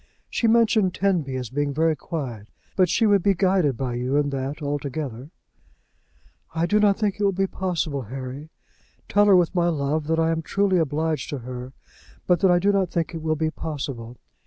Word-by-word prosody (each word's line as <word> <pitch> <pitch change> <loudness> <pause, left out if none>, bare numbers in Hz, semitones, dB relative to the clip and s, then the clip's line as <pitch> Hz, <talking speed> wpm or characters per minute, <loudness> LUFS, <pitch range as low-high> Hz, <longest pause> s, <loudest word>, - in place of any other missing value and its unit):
She 230 - +1
mentioned 220 -5 +3
Tenby 175 -9 0
as 125 -4 -4
being 145 0 -1
very 160 +1 +2
quiet, 125 -9 -6 0.3
but 185 -2 +3
she 225 - +2
would 205 -2 +4
be 200 +2 +2
guided 180 - +2
by 130 -3 -2
you 125 +3 -1
in 145 -1 +1
that 135 +2 -3
altogether." 140 -3 -4 1.3
"I 165 +1 +1
do 210 +4 +2
not 205 -2 +4
think 210 -2 -1
it - - 0
will 200 - +4
be 195 +1 0
possible, 170 -7 -2
Harry. 130 +5 -7 0.6
Tell 205 +1 +3
her 200 - +7
with 175 -1 +3
my 175 -2 +2
love, 150 -1 -1
that 160 0 +1
I 165 0 +2
am 165 0 -1
truly 195 +2 +1
obliged 155 -1 -1
to 145 - -3
her, 125 0 -7 0.5
but 180 -2 +3
that 190 - +4
I 175 - +5
do 200 +3 +3
not 195 -3 +1
think 170 0 -2
it 165 - -5
will 155 0 0
be 155 0 -1
possible. 135 -7 -6
160 Hz, 200 wpm, -24 LUFS, 140-190 Hz, 1.3 s, her